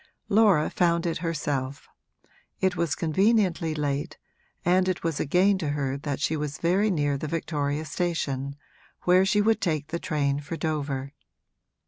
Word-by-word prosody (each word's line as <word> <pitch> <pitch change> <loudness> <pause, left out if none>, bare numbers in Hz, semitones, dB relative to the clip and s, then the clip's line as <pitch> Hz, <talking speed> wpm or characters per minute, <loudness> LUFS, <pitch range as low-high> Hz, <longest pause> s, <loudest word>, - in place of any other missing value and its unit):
Laura 205 -7 +4
found 170 -1 +2
it 165 -2 -1
herself; 145 -5 -3 0.7
it 190 -1 +1
was 170 -3 0
conveniently 180 -1 +2
late, 145 +1 -2 0.5
and 185 +2 +3
it 185 - -2
was 165 -3 -1
a - - -1
gain 190 +5 +3
to 155 -5 -2
her 140 -2 -1
that 140 -1 -4
she 155 +2 0
was 150 -1 -3
very 190 +5 +2
near 145 -6 0
the 155 - -4
Victoria 150 -2 -2
station, 140 -4 -2 0.5
where 185 +2 +4
she 210 +1 +3
would 220 +1 +2
take 155 -4 -1
the 170 +1 -3
train 145 -5 0
for 150 +3 -6
Dover. 145 -4 -3
160 Hz, 155 wpm, -26 LUFS, 145-180 Hz, 0.7 s, Laura